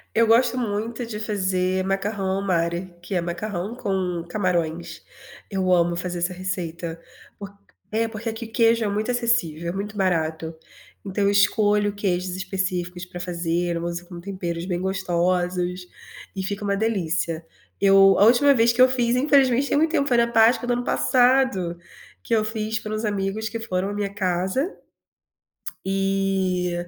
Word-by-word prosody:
Eu 230 - +5
gosto 235 +2 +3
muito 230 +1 -2
de 220 -2 -6
fazer 185 -3 0
macarrão 195 0 -1
ao - - -2
mare, 175 -1 -1
que 175 - -6
é 180 - +1
macarrão 180 +4 -4
com 185 -6 -2
camarões. 170 -3 -2 0.5
Eu 190 -2 0
amo 170 -1 +3
fazer 175 0 -3
essa 175 +2 -1
receita, 170 -3 -4 0.4
porq 200 0 -9 0.4
é, 225 +1 +1
porque 225 +1 -7
aqui 225 +1 -6
queijo 230 0 +3
é - - 0
muito 210 +3 -2
acessível, 205 -10 0
é - - -1
muito 200 +3 -5
barato. 165 -4 -1 0.5
Então 200 +1 -1
eu 200 - +4
escolho 205 0 +3
queijos 185 -3 -1
específicos 185 -2 -3
para 180 -1 -9
fazer, 175 -1 -1
eu 170 - -4
uso 175 0 -4
com 175 -2 -8
temperos 175 -2 -4
bem 180 -2 -2
gostosos, 180 -1 -1 0.5
e 190 - -3
fica 200 +2 -4
uma 200 0 +1
delícia. 175 -6 -1 0.3
Eu 195 -1 +6
a 200 - +7
última 255 +5 +6
vez 230 -1 +4
que 245 - +2
eu 255 - +8
fiz 245 -2 +1
infelizmente 270 -1 +3
tem - - +2
muito 315 +1 +2
tempo, 280 -4 +1
foi 245 -4 +3
na 235 0 +4
Páscoa 235 +2 +4
do 245 - +2
ano 245 0 -1
passado 245 -10 +2 0.5
que 230 - +1
eu 215 - +2
fiz 220 0 -2
para 215 - -6
uns 215 +1 -2
amigos 205 +1 -2
que 230 - -4
foram 195 -4 -2
à - - -4
minha 205 -1 -3
casa 190 - -1 1.1
e 195 -2 0
195 Hz, 165 wpm, -23 LUFS, 180-220 Hz, 1.1 s, eu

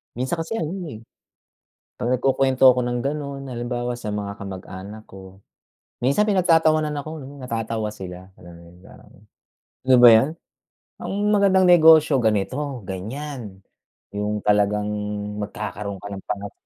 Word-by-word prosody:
Minsan 130 +7 -2
kasi 165 +6 -4
ano, 160 -7 -3 0.2
eh. 110 -8 -8 1.0
'Pag 120 - -2
nagkukuwento 135 0 +2
ako 125 0 +1
ng 120 0 -1
gano'n, 140 -1 -4
halimbawa 120 0 -3
sa 110 -3 -5
mga 100 -1 -5
kamag-anak 100 +2 -9
ko, 95 0 -13 0.7
minsan 140 +11 +3
pinagtatawanan 160 -6 +3
ako, 155 - -8
no, 140 +2 -11
natatawa 115 -2 -3
sila, 90 -2 -9
gano'n, 85 -1 -13 0.2
yung - - -22
parang - - -17 0.7
"Yun 130 -1 +5
ba 120 - +10
'yun? 115 +5 +5 0.7
Ang - - -4 0.2
magandang 195 -2 +4
negosyo 160 -4 +6
ganito, 125 +6 -1
ganiyan, 110 +2 -6 0.5
'yung 105 0 -3
talagang 105 0 +2 0.5
magkakaroon 105 -1 -5
ka 100 - -7
ng 95 -1 -8
pangat 100 -1 -5
120 Hz, 135 wpm, -22 LUFS, 105-145 Hz, 1.0 s, ba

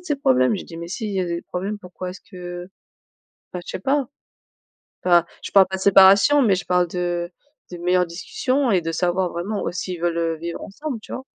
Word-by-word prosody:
de - - -20
ses 300 -5 -1
problèmes. 130 - +3
J'ai - - -7
dit: 165 - -10
«Mais 170 0 -7
s'il 215 +3 -4
y 195 -1 -1
a 180 - -1
des 170 0 -3
problèmes, 195 +4 -4
pourquoi 180 -1 -8
est-ce 185 - -10
que» 175 -2 -8 0.8
Enfin 180 - -5
je - - -10
sais - - -4
pas. 275 +6 +1 1.0
Enfin, 175 -2 +5 0.2
je - - -6
parle 195 -1 +7
pas 190 - -4
de - - -8
séparation, 200 +9 +6
mais 205 -6 +4
je 180 - -6
parle 180 -1 +2
de 175 0 -2 0.4
de 175 - -6
meilleures 180 +1 +2
discussions 255 +10 -1
et 190 -4 +3
de 165 0 -3
savoir 180 +2 0
vraiment 190 +5 -3
au - - -2
s'ils 180 -1 -4
veulent 165 -1 0
vivre 170 +1 -6
ensemble, 255 +3 -6
tu - - -12
vois? 260 - -5
180 Hz, 220 wpm, -22 LUFS, 175-200 Hz, 1.0 s, parle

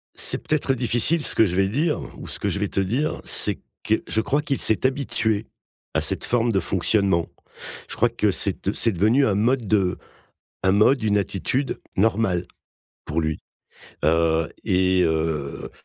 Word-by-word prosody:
C'est - - 0
peut-être 140 -3 0
difficile 125 +6 +1
ce - - +4
que 110 - +4
je 90 - -2
vais 95 0 +2
dire 150 +9 0 0.2
ou - - -9
ce - - +3
que - - -2
je 100 - -1
vais 105 - -1
te 95 - -1
dire, 125 +11 -1
c'est - - +1 0.2
que 110 - +1
je 110 - +1
crois 140 +6 0
qu'il 140 -3 -2
s'est 110 +4 +2
habitué 115 -5 0 0.5
à - - +2
cette - - 0
forme 120 -1 +2
de 95 - +1
fonctionnement. 95 -1 +1 0.6
Je - - -6
crois 120 +2 +3
que 110 -3 0
c'est, 95 0 -2
heu, 100 - 0
c'est 115 - +3
devenu 110 +10 +3
un 100 - +1
mode 120 +3 +1
de 95 -3 +1 0.7
un 95 - +3
mode, 110 +5 +3
une 105 -1 +2
attitude 110 - -2 0.2
normale, 95 -3 +1 0.6
pour 75 +3 -2
lui, 80 -1 -2 0.7
heu 80 0 +2 0.2
et 95 0 +2
heu 80 -3 -2
105 Hz, 180 wpm, -23 LUFS, 95-120 Hz, 0.7 s, ce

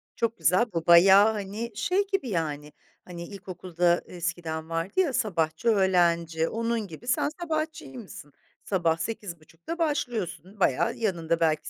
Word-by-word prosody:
Çok 230 -1 -1
güzel, 210 +7 +3
bu 165 0 -3
bayağı, 195 +5 +8
hani, 210 +3 -5
şey 385 - 0
gibi 385 - -1
yani 150 -4 -3 0.3
hani 175 -1 -8
ilkokulda 180 -3 -1
eskiden 170 -2 -4
vardı, 165 - -2
ya, 335 -8 +2
sabahçı, 165 -3 -1
öğlenci, 170 -5 +2
onun 230 -2 -2
gibi 170 +8 -11
sen 255 +3 +1
sabahçıymışsın. 310 - -5 0.3
Sabah 170 -4 +1
8.30'da 170 - -6
başlıyorsun 210 - -2
bayağı. 135 - +2
Yanında 170 -6 -1
belki 160 -2 +1
185 Hz, 130 wpm, -27 LUFS, 165-230 Hz, 0.3 s, bayağı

